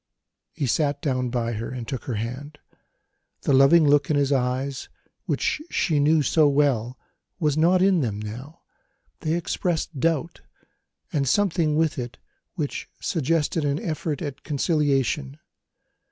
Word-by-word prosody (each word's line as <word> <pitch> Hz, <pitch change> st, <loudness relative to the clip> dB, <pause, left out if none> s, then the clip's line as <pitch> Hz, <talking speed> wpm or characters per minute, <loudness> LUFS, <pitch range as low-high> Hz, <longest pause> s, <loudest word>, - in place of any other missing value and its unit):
He 140 Hz, -, -3 dB
sat 145 Hz, +3 st, +1 dB
down 130 Hz, -4 st, -1 dB
by 120 Hz, -1 st, -1 dB
her 115 Hz, +1 st, -4 dB
and 125 Hz, -3 st, -6 dB
took 130 Hz, -, -5 dB
her 125 Hz, -, -3 dB
hand. 130 Hz, +7 st, -5 dB, 0.9 s
The 140 Hz, -, +2 dB
loving 140 Hz, +4 st, +6 dB
look 145 Hz, -1 st, +3 dB
in 155 Hz, -, +2 dB
his 140 Hz, -1 st, +1 dB
eyes, 130 Hz, +1 st, -1 dB, 0.4 s
which -, -, 0 dB
she 155 Hz, -6 st, +1 dB
knew 150 Hz, +1 st, +4 dB
so 155 Hz, +3 st, +4 dB
well, 135 Hz, -4 st, +1 dB, 0.4 s
was 150 Hz, -4 st, +1 dB
not 175 Hz, +4 st, +4 dB
in 190 Hz, -4 st, +4 dB
them 110 Hz, -6 st, -2 dB
now; 125 Hz, +10 st, -8 dB, 0.6 s
they 155 Hz, -1 st, -1 dB
expressed 170 Hz, -3 st, -2 dB
doubt, 165 Hz, +2 st, -1 dB, 0.7 s
and 140 Hz, -3 st, +1 dB
something 170 Hz, -6 st, +2 dB
with 160 Hz, -3 st, +1 dB
it 120 Hz, -1 st, -6 dB, 0.4 s
which 150 Hz, -6 st, -4 dB
suggested 160 Hz, 0 st, 0 dB
an 145 Hz, +1 st, 0 dB
effort 155 Hz, 0 st, -3 dB
at 145 Hz, -2 st, -6 dB
conciliation. 145 Hz, -2 st, 0 dB
145 Hz, 140 wpm, -24 LUFS, 130-160 Hz, 0.9 s, loving